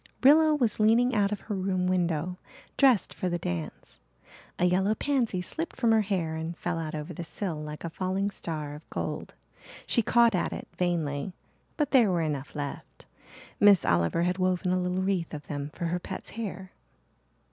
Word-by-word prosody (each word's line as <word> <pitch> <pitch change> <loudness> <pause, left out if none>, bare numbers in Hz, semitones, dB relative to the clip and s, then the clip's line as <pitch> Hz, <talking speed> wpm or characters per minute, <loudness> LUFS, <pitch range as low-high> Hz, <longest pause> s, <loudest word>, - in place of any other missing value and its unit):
Rilla 305 +3 +7
was 240 -8 +1
leaning 230 +4 +4
out 205 -2 +2
of 210 - -3
her 215 - -5
room 185 -1 0
window, 180 -1 0 0.4
dressed 260 -7 +4
for 185 - -2
the 175 - -1
dance. 85 - -5 0.6
A 180 - +2
yellow 190 +4 +2
pansy 235 -11 0
slipped 325 - -4
from 235 -3 +2
her 220 -1 +5
hair 185 -6 -1
and 160 +2 -4
fell 175 -1 -2
out 155 -1 -4
over 150 +3 -5
the 170 - -6
sill 165 -1 -4
like 150 0 -7
a 170 - -3
falling 190 +3 -1
star 155 -6 -5
of 150 +2 -12
gold. - - -4 0.5
She 235 - +3
caught 235 +1 +4
at 185 - 0
it - - -7
vainly 165 -3 -1 0.4
but 295 -2 0
there 245 -6 +6
were 175 -2 +1
enough 145 -2 -3
left. 145 -1 -6 0.5
Miss 205 -2 +6
Oliver 85 - +2
had 180 +1 0
woven 185 0 +1
a 185 0 +1
little 180 +1 -1
wreath 185 -5 -1
of 145 - -8
them 145 -1 -4
for 170 - -5
her 175 +2 -1
pet's 190 +2 -7
hair. 195 -4 -6
180 Hz, 185 wpm, -28 LUFS, 160-210 Hz, 0.6 s, Rilla